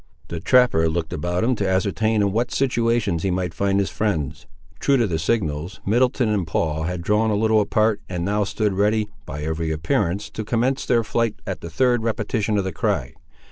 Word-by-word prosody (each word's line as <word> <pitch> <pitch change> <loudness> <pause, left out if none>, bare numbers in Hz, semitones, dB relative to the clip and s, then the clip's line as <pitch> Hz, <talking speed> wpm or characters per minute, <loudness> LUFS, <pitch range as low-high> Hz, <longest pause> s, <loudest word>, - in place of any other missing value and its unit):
The 85 - -4
trapper 80 -6 +4
looked 80 0 -3
about 90 +5 -1
him 125 +3 +2
to 100 -2 0
ascertain 105 +3 +1
in 100 - +1
what 115 +4 0
situations 115 -8 +1
he 95 - 0
might 90 -2 -1
find 100 0 +1
his 100 - -1
friends. 90 -11 -2 0.3
True 140 -1 +3
to 120 - +2
the 85 -6 -1
signals, 80 -2 -1
Middleton 125 +3 +2
and 100 -5 0
Paul 80 -1 -1
had 90 0 -3
drawn 105 +4 +2
a 105 - +1
little 110 +1 +3
apart, 110 +1 +1
and 90 -2 -3
now 105 +2 +1
stood 105 0 -1
ready, 105 +2 +1 0.2
by 75 +2 -5
every 80 +1 -2
appearance, 85 +5 -1
to 110 - -5
commence 125 +5 0
their 120 -2 +3
flight 110 +1 0
at 95 -5 -4
the 85 - -6
third 120 +7 +2
repetition 110 -1 -1
of 100 - +1
the 95 -1 -4
cry. 80 - -1
100 Hz, 200 wpm, -22 LUFS, 85-110 Hz, 0.3 s, trapper